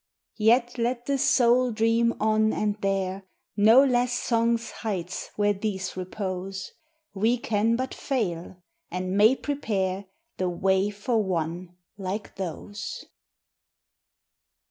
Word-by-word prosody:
_ - - -4
_Yet 240 +2 +3
let 240 +1 -1
the 275 0 0
soul 250 0 +4
dream 230 +1 +2
on 215 0 +3
and 210 0 -1
dare 195 -1 -1 0.3
No 220 +6 +7
less 245 -1 +2
Song's 230 -1 0
heights 185 -5 -4
where 205 0 +2
these 195 -2 -3
repose: 185 0 -5 0.4
We 220 +5 +2
can 225 0 +1
but 260 +2 -3
fail; 180 -8 -3 0.3
and 185 +1 -3
may 215 +5 +6
prepare 200 -10 -2 0.3
The 185 -1 0
way 190 +3 +1
for 210 +3 0
one 175 -1 -3 0.2
like 195 +2 -4
those. 195 +3 -6
210 Hz, 120 wpm, -26 LUFS, 190-235 Hz, 0.4 s, No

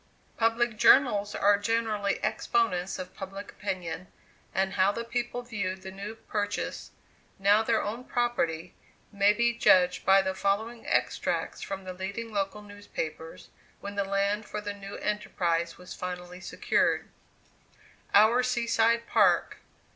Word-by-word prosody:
Public 230 0 +1
journals 210 -5 +5
are 200 0 +4
generally 210 -2 0
exponents 195 - 0
of 185 0 -7
public 195 +1 -8
opinion; 185 -3 -5 0.4
and 190 0 0
how 190 +1 +3
the 230 +3 -4
people 245 +1 -3
viewed 195 -6 -4
the 190 - -7
new 200 +3 -7
purchase, 205 -2 -3 0.5
now 200 +2 +4
their 225 0 +1
own 225 +5 -4
property, 180 -9 -1 0.4
may 200 0 +4
be 235 +2 +1
judged 180 -5 +4
by 195 0 +5
the 190 0 -1
following 220 +5 -1
extracts - - -1
from 195 -1 -5
the 185 0 -6
leading 200 +5 -5
local 200 +1 -2
newspapers, 200 -6 -7 0.3
when 200 - -6
the 200 0 0
land 200 +2 0
for 210 - -4
the 205 -1 -4
new 200 0 -9
enterprise 170 -5 -1
was 180 0 -10
finally 180 0 -6
secured: - - 0 1.1
OUR 220 +5 +6
SEA 250 -1 0
SIDE 235 0 +2
PARK. - - +3
205 Hz, 140 wpm, -28 LUFS, 190-225 Hz, 1.1 s, OUR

